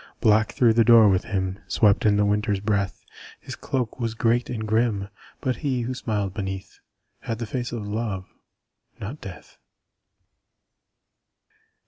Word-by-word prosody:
_ - - -41
Black 110 0 +3
through 120 -3 +4
the 115 +1 +4
door 115 -2 +7
with 95 -1 +1
him 95 -2 -2
Swept 105 0 +3
in 105 -1 +4
the 105 - +3
Winter's 105 -1 +1
breath; 100 -1 -1 0.3
His - - -8
cloak 125 -2 -3
was 115 -2 -2
great 120 +1 +1
and 110 -3 -4
grim 110 -3 +1 0.3
But 130 -1 -1
he, 135 -5 -1
who 120 +2 -3
smiled 105 -6 -2
beneath, 95 -2 -6 0.4
Had 115 - -4
the 115 - -4
face 120 +3 -4
of 110 -4 -5
Love 105 -3 -3 0.7
not 120 +9 -7
Death. 95 -2 -11
110 Hz, 150 wpm, -24 LUFS, 100-120 Hz, 0.7 s, door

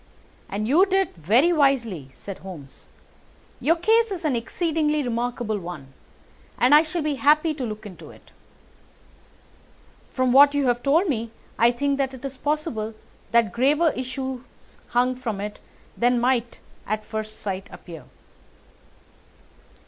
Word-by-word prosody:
"And 210 +2 -3
you 310 +9 +5
did 385 0 +1
very 230 - +3
wisely," 235 - +1
said 195 -2 -9
Holmes. 160 -8 -11 0.7
"Your 330 +3 +3
case 450 +6 +3
is 365 -5 -5
an 285 -5 +1
exceedingly 300 +5 0
remarkable 240 -3 -2
one, 160 -7 -9 0.6
and 250 +4 +4
I 300 - +9
shall 325 +1 -3
be 295 -2 -1
happy 305 +3 +4
to 285 -3 -5
look 215 -2 -5
into 190 -4 -11
it. - - -17 1.8
From 255 -1 +1
what 285 +2 +7
you 285 -1 +1
have 245 -1 +1
told 315 +9 +3
me 230 -6 -2 0.3
I 235 - +6
think 280 +3 -1
that 265 -1 -1
it 260 +1 -10
is 270 0 -5
possible 260 -7 -2 0.3
that 230 -2 +3
graver 295 +7 +3
issues 260 0 -5 0.5
hang 250 +1 +2
from 230 -6 -4
it 210 +1 -5 0.4
than 245 0 +2
might 240 -1 0 0.3
at 215 +1 -2
first 215 0 -6
sight 190 -1 -4
appear." 165 -3 -11
250 Hz, 140 wpm, -24 LUFS, 220-295 Hz, 1.8 s, I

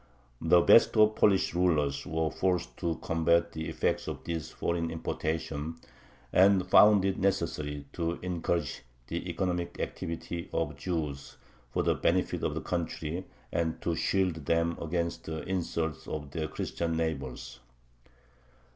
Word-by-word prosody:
The 85 +1 +5
best 115 +5 +6
of 105 0 +7
the - - -16
Polish 100 -2 +4
rulers 75 -6 +1
were 80 -1 0
forced 90 -2 -1
to 85 -2 -1
combat 85 +1 +2
the 80 -1 -4
effects - - -1
of - - -5
this 80 -2 -4
foreign 85 -1 -2
importation, 80 -1 -3 0.6
and 95 0 +5
found 100 +1 +7
it 95 -1 0
necessary 75 -6 -1
to 85 -1 -1
encourage 85 -4 -1 0.3
the 85 +2 -3
economic 90 0 -2
activity 85 +1 -4
of 80 -2 0
the - - -9
Jews 70 -3 -4 0.3
for - - 0
the - - +3
benefit - - +1
of - - -1
the - - -2
country 85 0 -3 0.3
and 80 -1 -1
to 85 - 0
shield 85 -3 0
them 85 0 +2
against 85 +1 -2
the 80 -1 -4
insults 85 -4 -2
of 75 -2 -5
their 80 +1 -2
Christian 80 +1 -2
neighbors. 70 -6 -3
85 Hz, 145 wpm, -30 LUFS, 80-90 Hz, 0.6 s, of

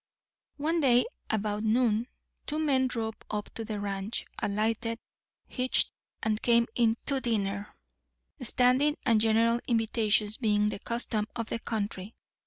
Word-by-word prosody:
One 320 +4 0
day, 250 -5 +4 0.2
about 210 -1 -1
noon, 225 0 +2 0.4
two 300 - -2
men 275 -4 +2
drove 225 -3 -3 0.2
up 210 -1 -4
to 225 - -5
the 215 -1 -4
ranch, 200 +2 -3 0.2
alighted, 225 +2 0 0.5
hitched, 255 0 +1 0.3
and 215 -1 0
came 235 -1 +4
in 230 -1 +2
to 275 -2 0
dinner; 205 -3 -2 0.6
standing 255 +5 +4
and 225 -4 +4
general 225 +1 +3
invitations 220 -2 +1
being 210 -3 +2
the 205 - -5
custom 230 -2 -2
of 230 -2 -4
the 230 - -2
country. 210 -2 -4
225 Hz, 135 wpm, -29 LUFS, 210-245 Hz, 0.6 s, day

